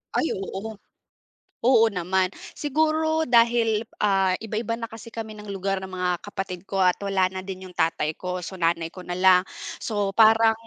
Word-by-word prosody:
Ay, 320 - +1
oo. 195 +3 -5 0.9
Oo 230 -3 +6
naman. 185 -1 0 0.3
Siguro 315 +2 +1
dahil, 230 -2 +4 0.2
ah, 195 -2 +3
iba-iba 225 +1 -3
na 230 - -4
kasi 225 0 -10
kami 220 -1 -6
ng 210 -1 -10
lugar 195 0 -2
ng 190 - -7
mga 180 -1 -1
kapatid 190 -3 -5
ko 195 - -2
at 180 -1 +5
wala 195 -2 +2
na 190 - -4
din 190 0 -7
yung - - -15
tatay 160 -1 0
ko, 180 0 -4
so 190 - -7
nanay 165 0 +1
ko 185 - -9
na 175 0 -4
lang. 185 -1 +6 0.4
So 205 -2 -1
parang, 225 +1 +6
195 Hz, 175 wpm, -25 LUFS, 185-225 Hz, 0.9 s, Oo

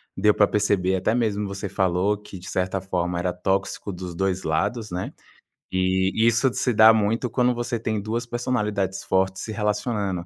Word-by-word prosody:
Deu 105 +2 +4
para 105 - +4
perceber, 100 -3 +1
até 100 +5 0
mesmo 105 -4 0
você 100 +1 -5
falou 95 +2 +1
que 100 -2 -11
de 90 - -11
certa 95 +1 -1
forma 90 -2 -2
era 90 0 -1
tóxico 95 +2 -2
dos 90 -1 -7
2 95 0 -1
lados, 105 +8 -1
né, 90 +1 -4 0.6
e 95 0 +1
isso 115 +2 +3
se 125 0 0
dá 110 +1 +8
muito 110 +3 0
quando 125 +1 +2
você 120 0 -2
tem 110 -1 -2
2 115 +4 -3
personalidades 105 -6 -2
fortes 95 0 0
se 110 - -5
relacionando. 105 -3 -1
100 Hz, 175 wpm, -24 LUFS, 95-110 Hz, 0.6 s, dá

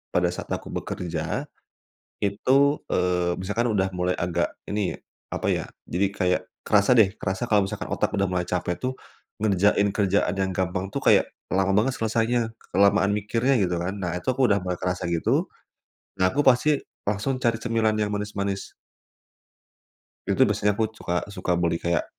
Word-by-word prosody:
pada 90 0 +3
saat 90 - -7
aku - - -3
bekerja. 90 -2 -3 0.7
Itu, 135 +8 +2
eee, 90 -1 +1
misalkan 110 +6 0
udah 95 -2 +1
mulai 90 0 +1
agak, 85 0 0 0.2
ini, 105 -3 -1 0.4
apa - - -2
ya, - - +1 0.2
jadi 95 +3 +1
kayak, 90 -2 +1 0.2
kerasa 105 +3 +4
deh, 110 -5 +5
kerasa 95 +4 -2
kalau 105 -3 +4
misalkan 100 +2 -5
otak 105 - -1
udah 100 -2 +1
mulai 90 -1 -1
capek 90 -1 -1
tuh, 130 +7 -2 0.5
ngerjain 100 0 +3
kerjaan 100 -3 +2
yang 95 -1 0
gampang 95 +1 -2
tuh, - - -1
kayak, - - +4 0.2
lama 95 +1 +1
banget 110 +6 +2
selesainya, 115 +1 0 0.2
kelamaan 100 +1 +4
mikirnya, 115 +6 +1
gitu 90 -3 +1
kan. 90 +3 -2
Nah, 90 -4 -3
itu - - -10
aku 135 0 +2
udah 100 - +4
mulai 90 0 -3
kerasa, 90 0 -2
gitu. 85 -1 +1 0.7
Nah, 95 - +4
aku 145 - +2
pasti 135 +3 +4 0.3
langsung 105 +6 0
cari 115 -3 +2
cemilan 115 -2 +1
yang 105 -1 0
manis-manis. 100 -1 -3 1.6
Itu, - - +2
biasanya 105 0 +1
aku 110 - +2
cuka 90 -5 -2
suka 90 - -1
beli 85 -1 0
kayak, 85 0 0
100 Hz, 160 wpm, -25 LUFS, 90-110 Hz, 1.6 s, deh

